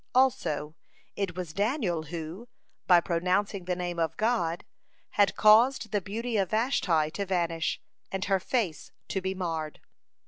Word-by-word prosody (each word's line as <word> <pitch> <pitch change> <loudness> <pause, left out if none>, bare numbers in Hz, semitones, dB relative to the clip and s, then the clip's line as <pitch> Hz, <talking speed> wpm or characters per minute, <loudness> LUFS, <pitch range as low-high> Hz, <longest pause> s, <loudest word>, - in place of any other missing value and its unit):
(44) - - +7
Also, 155 - -2 0.4
it 195 -3 -2
was 180 -4 -5
Daniel 205 - 0
who, 170 +7 -6 0.4
by 180 -2 +7
pronouncing 180 +3 0
the 180 0 -1
Name 175 -1 -3
of 165 -1 -1
God, 215 -7 0 0.5
had 205 -1 +3
caused 220 +1 +5
the 205 - +1
beauty 225 +5 -3
of 195 -3 +1
Vashti 185 - +1
to 200 - -3
vanish, 170 -4 -1 0.3
and 195 +1 -2
her 195 -1 +2
face 190 -5 -2 0.2
to 190 - -1
be 190 +1 -2
marred. 165 -4 -3
185 Hz, 150 wpm, -28 LUFS, 170-210 Hz, 0.5 s, 44